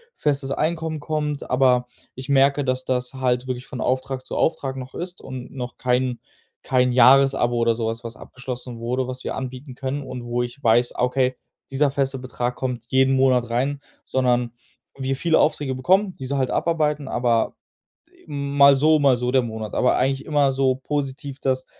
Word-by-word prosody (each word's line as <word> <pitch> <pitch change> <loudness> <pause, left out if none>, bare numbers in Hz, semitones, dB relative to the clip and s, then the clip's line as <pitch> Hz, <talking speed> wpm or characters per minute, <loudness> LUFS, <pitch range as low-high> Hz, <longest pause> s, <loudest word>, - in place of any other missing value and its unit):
festes 140 -2 0
Einkommen 160 +1 -1
kommt, 150 -1 -3
aber, 125 -2 +3 0.3
ich 130 +2 -8
merke, 140 +1 +4
dass 130 0 -1
das 125 0 -1
halt 125 -1 0
wirklich 125 0 -4
von 130 - -6
Auftrag 130 0 -2
zu - - -5
Auftrag 135 -4 0
noch 130 0 -8
ist 180 +1 -5
und 130 -1 -8
noch 125 -2 -6
kein 125 -1 0 0.4
kein 125 -1 +2
Jahresabo 130 -1 +5
oder 115 0 +3
sowas, 115 +1 -3
was 115 -1 -6
abgeschlossen 125 -1 -7
wurde, 125 +2 -2
was 130 0 -6
wir - - -2
anbieten 130 +1 -6
können 135 +2 -3
und 125 -2 -7
wo 120 +1 -2
ich 120 +4 -8
weiß: 120 +2 +4
„Ah, - - -3
okay, 130 0 +1 0.4
dieser 140 +2 +2
feste 135 -1 -1
Betrag 125 -1 -3
kommt 125 -3 -4
jeden 130 0 +3
Monat 130 -3 +3
rein“, 135 +4 -1 0.2
sondern, 125 -2 +1 0.4
wir 135 0 -1
viele 160 +3 +2
Aufträge 145 -3 +1
bekommen, 185 +9 +2
diese 135 +1 -2
halt 130 -2 0
abarbeiten, 150 -4 0
aber 120 -3 +1 0.7
mal 140 -1 +4
so, 155 +3 +4
mal 135 -3 +4
so 125 0 -1
der 130 - +4
Monat. 110 -2 -6
Aber 125 - +3
eigentlich 135 +2 0
immer 145 -3 +2
so 135 -1 +2
positiv, 140 0 -4
dass 130 -1 0
130 Hz, 175 wpm, -23 LUFS, 125-140 Hz, 0.7 s, Jahresabo